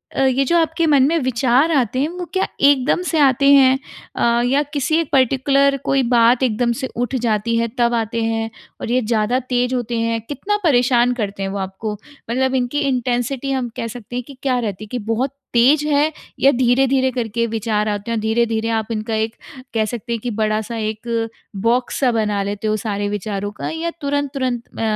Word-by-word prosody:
अ, - - +1
ये 265 +1 +2
जो 340 +6 +2
आपके 325 0 +1
मन 280 -3 +5
में 330 +3 +2
विचार 260 +3 +2
आते 255 -4 +1
हैं 295 +4 +1
वो 355 0 -6
क्या 380 0 +1
एकदम 280 +3 +4
से 330 -3 0
आते 275 -1 +4
हैं, 265 -1 +5 0.4
अ, 235 0 +2
या 270 +4 +2
किसी 290 +2 +1
एक 325 -3 -2
पर्टिकुलर 275 +1 +3
कोई 275 -1 +2
बात 240 +1 +4
एकदम 235 0 +1
से 260 - -2
उठ 245 +2 -2
जाती 230 0 0
है 230 0 +1
तब 240 -1 +2
आते 230 0 -1
हैं 225 0 -1 0.3
और - - -3
ये 255 +1 +2
ज़्यादा 225 +2 +1
ते 245 -1 +2
होते 240 -2 -2
हैं 230 0 0
कितना 290 - -2
परेशान 245 -5 +3
करते 205 -5 -4
हैं 195 - -2
वो 200 - -4
आपको? 195 +3 -4 0.4
मतलब 260 +2 +1
इनकी 255 +3 0
इंटेंसिटी 255 0 -1
हम 260 -3 -1
कह 230 - -2
सकते 240 +1 -9
हैं 250 - -2
कि 275 -3 -12
क्या 255 -2 +1
रहती 210 -3 -4
है 215 - -9
कि 250 - -2
बहुत 255 +4 0 0.2
तेज़ 285 +6 +4
है 295 +1 +2 0.3
या 275 - +5
धीरे-धीरे 260 +1 +2
करके 235 -1 -1
विचार 215 -1 -1
आते 205 +2 -3
हैं 230 - 0
और - - -2
धीरे-धीरे 225 0 0
आप 220 - -10
इनका 220 0 -2
एक 220 +1 -1 0.4
कह 220 -1 +1
सकते 235 +2 -4
हैं 230 - -2
कि 245 - -2
बड़ा-सा 215 +2 -1
1 225 +1 -2 0.4
बॉक्स 245 +1 +1
सा 260 -3 +3
बना 210 -3 0
लेते 205 +2 -3
हो 215 0 +1
सारे 205 0 -1
विचारों 205 0 -3
का - - -2
या 325 +1 -3
तुरंत-तुरंत 275 -4 -1 0.2
अ, - - -2
245 Hz, 205 wpm, -19 LUFS, 225-270 Hz, 0.4 s, मन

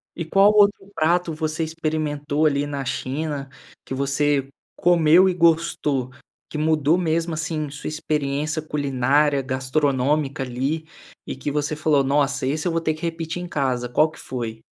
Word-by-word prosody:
E 170 - -4
qual 195 +5 +5
outro 205 -1 +3
prato 165 +1 +1
você 155 +1 -2
experimentou 155 -2 -1
ali 145 -1 +2
na 140 -1 -4
China, 140 +2 -3 0.4
que - - -6
você 140 +1 +1 0.3
comeu 175 +1 +5
e - - 0
gostou, 160 -6 +1 0.4
que - - -5
mudou 155 +1 +2
mesmo, 165 -1 0
assim, 155 -1 -3
sua 145 +1 -7
experiência 155 0 -2
culinária, 145 -1 +1
gastronômica 135 +1 0
ali 135 +6 -3 0.4
e - - -5
que 140 +2 -4
você 150 +1 -1
falou: 150 -2 +2
"Nossa 140 0 +1
esse 155 +5 -1
eu - - +1
vou 165 0 0
ter 155 -1 0
que 155 - -12
repetir 165 0 -3
em 180 - -6
casa.", 130 -5 -1
qual 155 +6 +3
que 160 - -15
foi? 115 -3 -5
150 Hz, 160 wpm, -23 LUFS, 140-160 Hz, 0.4 s, qual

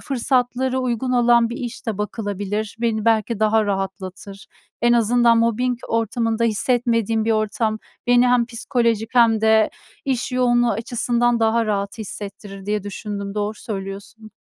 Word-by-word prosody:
fırsatları 260 0 0
uygun 255 0 -1
olan 235 -1 +4
bir 235 - -5
iş 245 0 -7
de 210 -3 -2
bakılabilir. 205 0 -3
Beni 220 -2 0
belki 225 -1 +1
daha 215 0 +3
rahatlatır. 195 0 -5 0.4
"En 240 0 +4
azından 235 0 +4
mobbing 235 +2 +1
ortamında 230 0 0
hissetmediğim 230 -1 +1
bir 225 - +2
ortam 215 0 0 0.3
beni 245 0 +5
hem 245 -1 +3
psikolojik 230 -1 -1
hem 230 -3 +5
de 220 0 +4 0.3
iş 255 -1 -2
yoğunluğu 240 -1 +3
açısından 235 +1 0
daha 225 0 +2
rahat 200 +2 -2
hissettirir." 200 -1 -8
diye 210 -1 -1
düşündüm, 200 0 -6
doğru 210 +1 -2
söylüyorsun. 205 +1 -7
225 Hz, 135 wpm, -21 LUFS, 210-240 Hz, 0.4 s, beni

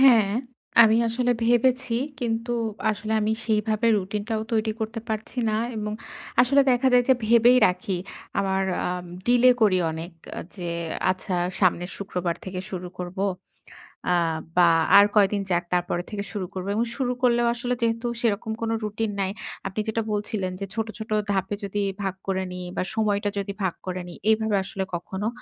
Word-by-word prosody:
হ্যাঁ, 230 -7 +6 0.5
আমি 225 0 +5
আসলে 245 +2 0
ভেবেছি 245 +1 +2 0.3
কিন্তু 230 0 -1 0.4
আসলে 215 +1 -3
আমি 215 +1 +1
সেইভাবে 215 +1 +1
রুটিন 200 +2 -3
টাও 220 -1 -1
তৈরি 220 0 +1
করতে 220 +1 -3
পারছি 220 +3 -4
না 215 - +1 0.2
এবং 210 0 -3 0.5
আসলে 275 +3 +5
দেখা 250 +1 +3
যায় 245 0 +5
যে 260 - +7
ভেবেই 235 +2 +6
রাখি 185 +1 -1 0.4
আমার 195 0 +1 0.2
আম 180 0 -3 0.2
ডিলে 245 +1 +6
করি 200 -4 +4
অনেক 165 +2 -6 0.3
আ - - -3 0.2
যে 175 -3 -4 0.4
আচ্ছা, 185 0 -2 0.3
সামনের 180 -1 +2
শুক্রবার 180 -3 -2
থেকে 185 -1 -4
শুরু 180 -1 -5
করব 180 +1 -6 0.9
আ - - +4 0.4
বা 175 -1 +7 0.3
আর 200 - +9
কয়দিন 205 -1 +4
যাক 175 -1 +2
তারপরে 175 0 0
থেকে 200 -1 -4
শুরু 200 -3 -3
করব 185 -1 -4
এবং 230 +2 +1
শুরু 250 -2 0
করলেও 240 -1 +3
আসলে 245 +1 -2
যেহেতু 230 +1 0
সেরকম 220 -1 0
কোন 225 - -1
রুটিন 215 0 -2
নাই। 190 - 0 0.4
আপনি 195 +2 -5
যেটা 220 +1 0
বলছিলেন 205 -2 -2
যে 195 - -3
ছোট, 225 0 -2
ছোট 220 -1 -8 0.2
ধাপে 195 +1 0
যদি 200 +1 -2 0.2
ভাগ 195 -2 -1
করে 190 -1 0
নি 180 - -6 0.2
বা - - 0
সময়টা 205 -2 +1
যদি 200 0 -2
ভাগ 185 -3 +1
করে 185 0 -3
নি 175 - -8 0.2
এইভাবে 220 -1 +2
আসলে 190 0 -3
কখনো 190 +4 -4
210 Hz, 170 wpm, -25 LUFS, 190-230 Hz, 0.9 s, আর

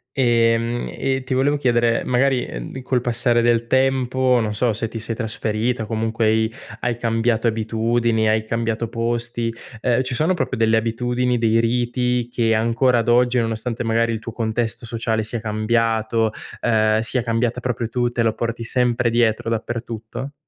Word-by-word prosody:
Ehm, 115 -1 +2
e 135 -1 -1
ti 130 +1 -3
volevo 135 +3 +2
chiedere, 120 -4 +2
ehm, - - -7
magari, 130 +1 +2
ehm, - - -7
col 125 -1 0
passare 120 0 +1
del 115 0 +2
tempo, 130 0 +2
non 105 -1 -2
so 115 +3 +1
se 110 +2 -2
ti 115 +1 -6
sei 115 0 -3
trasferita 110 +1 -2
o - - -5
comunque 115 0 -1
hai 110 +1 +2 0.3
hai 120 -1 -1
cambiato 115 0 +1
abitudini, 115 0 +1
hai 110 0 +2
cambiato 115 0 -2
posti, 115 0 -2 0.3
ehm, 125 +1 +2
ci 125 - -4
sono 160 +8 +1
proprio - - -2
delle 110 0 +3
abitudini, 120 +2 0
dei 115 0 +3
riti 120 +1 0
che 115 -2 +1
ancora 115 +3 +2
ad 115 - -2
oggi, 125 +1 +3
nonostante 115 +1 -2
magari 115 0 +1
il 110 - -3
tuo 115 - -7
contesto 115 +1 -2
sociale 115 -1 -1
sia 110 +2 -4
cambiato, 110 0 0 0.3
ehm, 110 -1 +2
sia 115 +2 -1
cambiata 115 +1 0
proprio 125 -2 -2
tu, 120 0 0
te 120 - -1
lo 115 -1 +2
porti 115 +1 -3
sempre 120 0 +1
dietro, 115 -1 +1
dappertutto? 115 +3 -4
115 Hz, 170 wpm, -21 LUFS, 115-125 Hz, 0.3 s, delle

